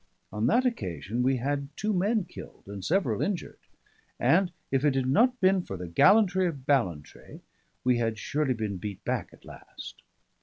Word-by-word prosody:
On 105 +2 0
that 250 - +3
occasion 105 - -2
we 130 +1 +2
had 140 +2 -2
two 210 +1 -1
men 205 +3 +1
killed 175 - -12
and 100 -1 -8
several 190 +5 0
injured, 195 -3 -3 0.6
and 180 +1 +3 0.2
if 135 0 +1
it 145 -3 +3
had 135 -1 +1
not 245 - +3
been 190 -1 +3
for 95 - -7
the 90 0 -6
gallantry 190 - +4
of 140 -6 -6
Ballantrae 90 - -2 0.4
we 125 -1 +2
had 115 -1 -1
surely 140 +3 -1
been 105 -3 -3
beat 100 +1 -7
back - - -2
at - - -19
last. - - -11
135 Hz, 175 wpm, -28 LUFS, -, 0.6 s, gallantry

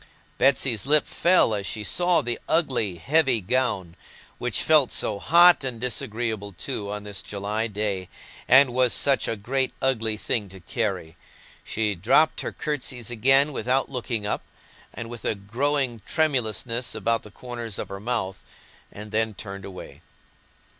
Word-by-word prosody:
Bessy's 135 -5 +2
lip 150 +1 +4
fell 175 -10 +3
as 100 -2 -3
she 110 - -4
saw 175 - +2
the 120 -1 -3
ugly, 130 - +1
heavy 135 - +3
gown—which 105 +1 -3
felt 155 -5 +5
so 105 -2 0
hot 175 - +6
and 125 -3 -4
disagreeable 110 -3 -3
too, 100 +3 -5
on 105 0 -5
this 100 -1 -5
July 105 +3 -3
day, 100 -4 -3 0.4
and 130 0 +6
was 125 -1 +3
such 140 -1 +2
a 115 - 0
great 130 +6 -2
ugly 115 -5 0
thing 105 -2 -2
to 95 +1 -12
carry. 95 -4 -3 0.5
She 105 -1 -1
dropped 110 - +3
her - - -4
curtsies 130 -6 -3
again, 135 +5 +4
without 130 +2 0
looking 120 -4 -3
up, 105 - -2 0.5
and 115 - -7
with 120 0 -9
a - - 0
growing 120 +4 -1
tremulousness 125 -5 -1
about 115 -1 0
the 105 - -12
corners 120 -1 -7
of - - -5
her 100 - -6
mouth, 105 -4 -3 0.5
and 105 +1 -10
then 110 -1 0
turned 100 -1 -7
away. 95 -2 -10
115 Hz, 150 wpm, -25 LUFS, 105-130 Hz, 0.5 s, hot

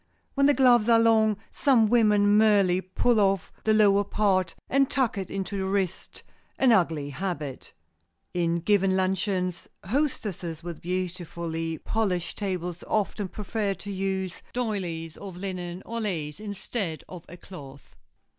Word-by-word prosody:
When 275 0 +3
the 290 - +4
gloves 240 -3 +5
are 230 - +7
long, 220 -2 +4
some 250 -6 +3
women 210 -3 +4
merely 200 -4 +4
pull 215 +5 +1
off 195 -3 +1
the 220 - +4
lower 205 -2 +5
part 195 -4 +1
and 275 0 +2
tuck 260 -5 +1
it 195 -2 -4
into 195 +1 -3
the 190 - -1
wrist, 190 -2 -2 0.3
an 260 -2 +4
ugly 165 -8 +2
habit. 150 -4 -5 0.6
In 170 -1 +1
giving 195 0 +2
luncheons, 185 -1 -1 0.2
hostesses 195 - -2
with 170 -2 -7
beautifully 170 -2 -3
polished 185 -2 -2
tables 180 -4 -3
often 210 -1 -1
prefer 205 +1 -3
to 205 - -8
use 190 -1 -3
doilies 180 -9 -3
of 195 -3 -8
linen 180 -1 -5
or 230 0 -4
lace 160 -7 -2
instead 205 -4 -3
of 180 -3 -9
a 175 - -10
cloth. 145 -7 -12
195 Hz, 140 wpm, -26 LUFS, 175-215 Hz, 0.6 s, are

